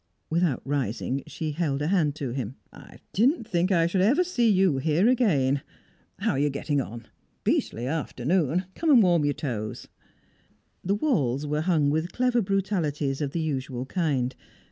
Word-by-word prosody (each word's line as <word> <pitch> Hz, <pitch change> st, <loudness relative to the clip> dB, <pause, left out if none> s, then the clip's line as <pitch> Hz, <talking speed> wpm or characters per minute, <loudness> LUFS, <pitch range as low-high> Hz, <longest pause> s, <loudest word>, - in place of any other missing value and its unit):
Without 165 Hz, -5 st, +1 dB
rising, 135 Hz, -1 st, -2 dB
she 155 Hz, -2 st, -4 dB
held 145 Hz, -3 st, -1 dB
a 150 Hz, -, -1 dB
hand 160 Hz, -7 st, +2 dB
to 140 Hz, -5 st, -4 dB
him. 125 Hz, -1 st, -4 dB, 0.2 s
"I -, -, -14 dB, 0.2 s
didn't 240 Hz, -, +2 dB
think 180 Hz, -2 st, +1 dB
I 170 Hz, -3 st, +4 dB
should 180 Hz, +2 st, +1 dB
ever 265 Hz, -, +4 dB
see 245 Hz, -11 st, +1 dB
you 185 Hz, -8 st, +3 dB
here 160 Hz, -, +2 dB
again. 145 Hz, -, +2 dB, 0.6 s
How -, -, 0 dB
are 135 Hz, -, -1 dB
you 145 Hz, +1 st, +2 dB
getting 140 Hz, +1 st, -1 dB
on? 115 Hz, -2 st, -8 dB, 0.4 s
Beastly 120 Hz, -, 0 dB
afternoon 160 Hz, +4 st, 0 dB
come 330 Hz, -, -1 dB
and 250 Hz, -7 st, +7 dB
warm 170 Hz, -5 st, +3 dB
your 145 Hz, -, +1 dB
toes." 110 Hz, -7 st, -5 dB, 0.9 s
The 195 Hz, +3 st, +1 dB
walls 150 Hz, -, 0 dB
were 150 Hz, +1 st, -1 dB
hung 155 Hz, -4 st, +2 dB
with 160 Hz, +3 st, -1 dB
clever 250 Hz, -1 st, +2 dB
brutalities 170 Hz, -8 st, -1 dB
of 145 Hz, -, 0 dB
the 165 Hz, +4 st, -3 dB
usual 135 Hz, -4 st, -3 dB
kind. 135 Hz, -6 st, -1 dB
155 Hz, 165 wpm, -26 LUFS, 135-190 Hz, 0.9 s, and